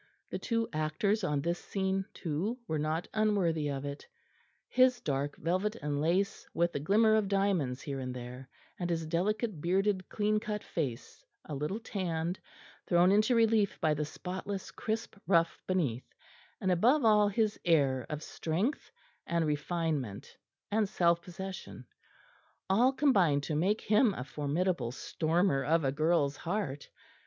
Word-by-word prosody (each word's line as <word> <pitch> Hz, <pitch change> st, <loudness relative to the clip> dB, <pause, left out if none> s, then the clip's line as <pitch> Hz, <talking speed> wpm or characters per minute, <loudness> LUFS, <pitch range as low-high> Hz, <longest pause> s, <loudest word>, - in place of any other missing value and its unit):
The -, -, -3 dB
two 230 Hz, -1 st, 0 dB
actors 155 Hz, +8 st, 0 dB
on 150 Hz, -5 st, 0 dB
this 170 Hz, +1 st, -1 dB
scene 190 Hz, -1 st, -1 dB
too 180 Hz, +9 st, -2 dB
were 155 Hz, -4 st, -1 dB
not 155 Hz, +3 st, -1 dB
unworthy 190 Hz, -8 st, +1 dB
of 140 Hz, 0 st, -3 dB
it; 140 Hz, 0 st, -6 dB, 0.6 s
his 255 Hz, -1 st, +4 dB
dark 140 Hz, -, -2 dB
velvet 185 Hz, +6 st, 0 dB
and 145 Hz, -9 st, -2 dB
lace 180 Hz, +5 st, 0 dB
with 170 Hz, +1 st, +2 dB
the -, -, -1 dB
glimmer 215 Hz, +8 st, +4 dB
of 215 Hz, -2 st, +3 dB
diamonds 190 Hz, -10 st, 0 dB
here 140 Hz, -2 st, -4 dB
and 130 Hz, -1 st, -4 dB
there, 125 Hz, +1 st, -8 dB, 0.3 s
and 175 Hz, -1 st, -2 dB
his 165 Hz, -1 st, -1 dB
delicate 200 Hz, +3 st, -1 dB
bearded 190 Hz, +2 st, +1 dB
clean 210 Hz, 0 st, +1 dB
cut 210 Hz, -1 st, -4 dB
face, 135 Hz, -7 st, -4 dB, 0.2 s
a 150 Hz, -, -6 dB
little 150 Hz, +9 st, -2 dB
tanned, 175 Hz, -5 st, -3 dB, 0.5 s
thrown 175 Hz, +1 st, +5 dB
into 215 Hz, +4 st, +4 dB
relief 225 Hz, -3 st, +3 dB
by 155 Hz, -, +2 dB
the 150 Hz, 0 st, -1 dB
spotless 185 Hz, +5 st, -5 dB
crisp 220 Hz, -1 st, -4 dB
ruff 165 Hz, -3 st, +2 dB
beneath, 145 Hz, -10 st, -1 dB, 0.4 s
and 190 Hz, -, +1 dB
above 240 Hz, -, +4 dB
all 210 Hz, -1 st, +6 dB
his 215 Hz, +1 st, 0 dB
air 140 Hz, -7 st, +2 dB
of 150 Hz, 0 st, -4 dB
strength 185 Hz, -, -2 dB, 0.4 s
and 170 Hz, -1 st, +1 dB
refinement 150 Hz, -, -2 dB, 0.4 s
and 210 Hz, -1 st, +2 dB
self 170 Hz, -3 st, +2 dB
possession 190 Hz, +2 st, -8 dB, 0.8 s
all 235 Hz, +7 st, +4 dB
combined 195 Hz, -, +3 dB
to 155 Hz, -, -3 dB
make 190 Hz, +8 st, +1 dB
him 210 Hz, -1 st, +3 dB
a 125 Hz, -, -4 dB
formidable 150 Hz, -1 st, -1 dB
stormer 160 Hz, +1 st, 0 dB
of 160 Hz, +2 st, +2 dB
a 135 Hz, -, +1 dB
girl's 150 Hz, -1 st, +1 dB
heart. 165 Hz, -7 st, -3 dB
175 Hz, 150 wpm, -31 LUFS, 150-205 Hz, 0.8 s, all